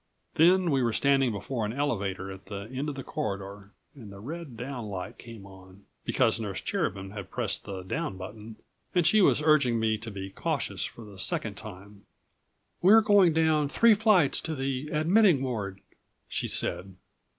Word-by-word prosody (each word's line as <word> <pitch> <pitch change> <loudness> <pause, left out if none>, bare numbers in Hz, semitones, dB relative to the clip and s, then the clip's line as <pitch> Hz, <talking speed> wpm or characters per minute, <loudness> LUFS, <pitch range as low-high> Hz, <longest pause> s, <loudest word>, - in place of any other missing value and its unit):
Then 175 +1 +4
we 135 -2 +2
were 120 -2 +1
standing 135 0 +3
before 110 +4 -4
an 105 +1 -2
elevator 100 -9 -2
at 95 +1 -11
the 100 0 -5
end 140 +4 -2
of 145 - -5
the 135 - -6
corridor 100 -2 -5 0.2
and 115 -8 -12
the 100 - -11
red 145 +2 -7
down 125 -2 -5
light 95 -3 -6
came 115 -4 -11
on... 95 0 -15 0.2
because - - +2
Nurse 105 -4 -3
Cherubin 95 0 -3
had 100 -2 -8
pressed 115 -3 -3
the 95 -2 -6
down 95 +1 -3
button... 105 +4 -9 0.4
and 175 -2 +3
she 210 +6 +5
was 155 - +4
urging 140 -7 +4
me 110 -1 +1
to 115 +1 -6
be 95 -2 -7
cautious - - -2
for 115 - -9
the 100 -2 -13
second 105 +2 -1
time. 100 0 -11 0.7
"We're 210 +5 +7
going 200 -5 +5
down 155 -2 +2
three 230 +9 +5
flights 205 -8 +3
to 160 - -3
the 135 +1 -3
admitting 165 -1 +4
ward," 100 -7 -4 0.5
she - - -3
said. 95 +1 -2
115 Hz, 175 wpm, -28 LUFS, 100-150 Hz, 0.7 s, We're